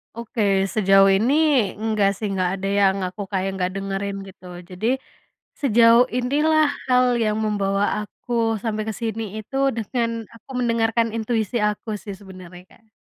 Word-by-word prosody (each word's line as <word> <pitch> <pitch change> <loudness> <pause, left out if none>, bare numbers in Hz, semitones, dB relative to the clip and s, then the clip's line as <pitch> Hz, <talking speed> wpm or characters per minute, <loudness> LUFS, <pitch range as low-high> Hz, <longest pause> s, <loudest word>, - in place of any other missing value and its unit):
Oke 230 0 -5 0.3
sejauh 195 -2 +5
ini 220 +8 +2 0.4
enggak 215 -2 +1
sih, 215 - -3
enggak 185 -2 0
ada 195 - -3
yang 195 -1 +3
aku 185 +3 -8
kayak 190 -1 -1
enggak 185 -1 -1
dengerin 195 0 -3
gitu. 190 -1 -15 0.2
Jadi 185 +4 -3 0.7
sejauh 235 -2 +5
inilah 300 +5 +2 0.2
hal 250 0 +4 0.2
yang 215 -1 0
membawa 200 -1 0 0.2
aku 240 - -11 0.3
sampai 215 -2 -2
ke - - -1
sini 225 -1 -3 0.2
itu 220 +5 -8 0.2
dengan 230 +2 -1 0.3
aku 230 +3 -18
mendengarkan 230 -1 +1
intuisi 220 0 -1
aku 210 +2 -6
sih 200 - -7
sebenarnya 185 -2 -12
Kak. 220 -1 -24
215 Hz, 145 wpm, -22 LUFS, 195-230 Hz, 0.7 s, sejauh